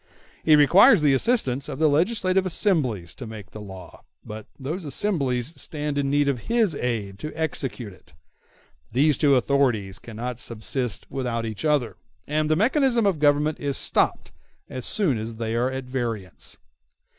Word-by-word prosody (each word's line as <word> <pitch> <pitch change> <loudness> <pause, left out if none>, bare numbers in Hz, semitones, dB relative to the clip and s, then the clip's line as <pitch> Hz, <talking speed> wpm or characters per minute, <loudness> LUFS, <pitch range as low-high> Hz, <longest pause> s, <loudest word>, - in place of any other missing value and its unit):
He 155 - +6
requires 175 - +6
the 145 -2 +4
assistance 135 - +1
of - - -5
the 155 +1 +3
legislative 185 +4 +2
assemblies 135 - 0
to 125 - -9
make 105 -3 -10
the 105 - -9
law, 95 -3 -11 0.2
but 110 0 -8
those 155 +7 -5
assemblies 140 - -1
stand 150 -1 -4
in 140 -1 0
need 145 0 +2
of 135 -4 0
his 230 -7 +2
aid 110 -7 -3
to 155 - -5
execute 135 -8 -3
it: - - -21 0.8
these 145 +5 +3
two 140 0 +3
authorities 125 -7 +1
cannot 120 +2 -6
subsist 115 -2 -4
without 125 -4 -2
each 110 +2 -6
other, 145 -7 +1 0.3
and 155 +1 0
the 155 - +3
mechanism 240 - +2
of 190 -6 +1
government 150 +1 +2
is 140 -2 -2
stopped - - 0 0.4
as 130 -2 -3
soon 160 - +3
as 110 +1 -5
they 110 0 -3
are 120 +2 +1
at 130 0 -5
variance. 120 -7 -5
135 Hz, 160 wpm, -24 LUFS, 115-155 Hz, 0.8 s, He